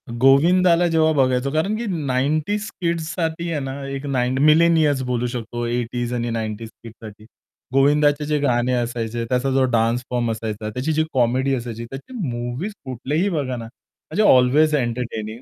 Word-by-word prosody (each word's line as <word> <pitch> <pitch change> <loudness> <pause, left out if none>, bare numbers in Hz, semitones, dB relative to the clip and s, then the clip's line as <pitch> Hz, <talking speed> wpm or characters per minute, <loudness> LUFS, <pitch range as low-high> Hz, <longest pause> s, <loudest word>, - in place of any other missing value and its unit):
गोविंदाला 165 +9 +4
जेव्हा 160 -1 +3
बघायचो 130 -1 +1
कारण 160 +8 0
की 235 - -4 0.2
90s 155 +11 0
किड्स 170 -1 -1
साठी 170 0 -2
आहे 155 - -1
ना, 135 -1 -4
एक 135 +1 -5
9 130 -2 0
मिलेनियर्स 155 -3 +4
बोलू 125 0 0
शकतो. 120 0 -4
80s 120 0 -2
आणि 120 -1 -2
90s 110 0 -4
किड्स 115 -1 -11
साठी 105 0 -11 0.5
गोविंदाचे 145 +2 +3
जे 150 0 0
गाणे 125 -3 +1
असायचे 120 -1 -2
त्याचा 125 +3 0
जो 135 0 +3
डान्स 115 +1 +1
फॉर्म 120 -2 0
असायचा 110 -1 -4
त्याची 130 +8 -2
जी 155 +1 +2
कॉमेडी 130 +2 +1
असायची 115 -2 -6
त्याची 135 - -9
मूव्हीज 120 - -4
कुठलेही 140 - -1
बघा 140 -8 -2
ना, 115 -1 -6
म्हणजे 135 - -5
अल्वेज 150 +5 +3
एंटरटेनिंग 120 -3 -3
130 Hz, 160 wpm, -21 LUFS, 120-155 Hz, 0.5 s, गोविंदाला